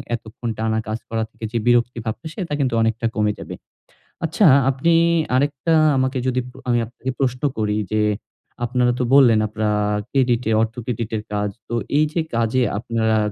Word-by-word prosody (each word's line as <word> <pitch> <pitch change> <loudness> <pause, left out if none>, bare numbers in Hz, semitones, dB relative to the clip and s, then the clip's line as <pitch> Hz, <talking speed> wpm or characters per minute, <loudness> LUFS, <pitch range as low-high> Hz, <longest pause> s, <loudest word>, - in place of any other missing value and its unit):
এতক্ষণ 115 +1 -7
টানা 110 0 0
কাজ 110 +1 -2
করার 115 -1 -1
থেকে 115 - -7
যে 120 - -1
বিরক্তি 120 0 +2
ভাবটা, 110 +8 -5
সেটা 175 -7 -4
কিন্তু 130 -4 0
অনেকটা 115 +1 0
কমে 105 -1 +2
যাবে। - - -7 0.7
আচ্ছা 165 +6 +2 0.2
আপনি 135 +6 +2 0.4
আরেকটা 145 +4 +1 0.2
আমাকে 130 0 0
যদি 130 0 +1
প্র 130 - -16
আমি 120 -1 +3
আপনাকে 130 +3 -5
প্রশ্ন 125 -2 0 0.2
করি 105 -1 0
যে, 110 - +2 0.6
আপনারা 125 0 +2
তো - - +1
বললেন 125 -6 +6
আপনারা 105 0 -1 0.4
ক্রেডিটে 125 -4 +1
অর্থ 115 0 -1
ক্রেডিট 115 -2 -3
এর 105 - -5
কাজ। 105 0 0 0.2
তো 120 - -6 0.2
এই 155 - +4
যে 170 - +1
কাজে 115 +2 +1
আপনারা 110 -1 0
120 Hz, 170 wpm, -21 LUFS, 110-130 Hz, 0.7 s, বললেন